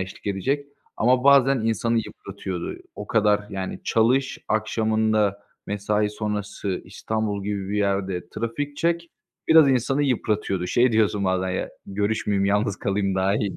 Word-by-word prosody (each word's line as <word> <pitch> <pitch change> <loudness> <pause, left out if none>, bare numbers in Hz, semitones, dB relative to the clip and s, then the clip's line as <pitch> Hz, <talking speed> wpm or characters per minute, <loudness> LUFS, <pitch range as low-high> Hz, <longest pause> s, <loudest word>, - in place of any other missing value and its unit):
eşlik 95 +2 -7
edecek 135 +9 -1 0.3
ama 125 +2 +3
bazen 135 -2 +5
insanı 115 +1 +1
yıpratıyordu. 95 -4 -5 0.2
O 105 - -7
kadar, 105 -2 +3
yani, 95 -1 -5
çalış, 125 +4 +2
akşamında 110 -2 +1 0.2
mesai 105 +1 0
sonrası 105 -2 -3
İstanbul 110 -2 -3
gibi 100 -2 -3
bir 105 - -2
yerde 95 -3 -1
trafik 115 +8 -4
çek, 170 +1 0 0.4
biraz 160 -3 +7
insanı 135 +2 +1
yıpratıyordu. 105 -8 0
Şey 120 +6 +3
diyorsun 105 -2 +2
bazen 95 0 0
ya 90 - -2 0.2
görüşmeyeyim, 100 0 0
yalnız 100 0 +1
kalayım 100 -1 -1
daha 95 +1 +2
iyi 100 -3 -2
105 Hz, 135 wpm, -24 LUFS, 100-115 Hz, 0.4 s, biraz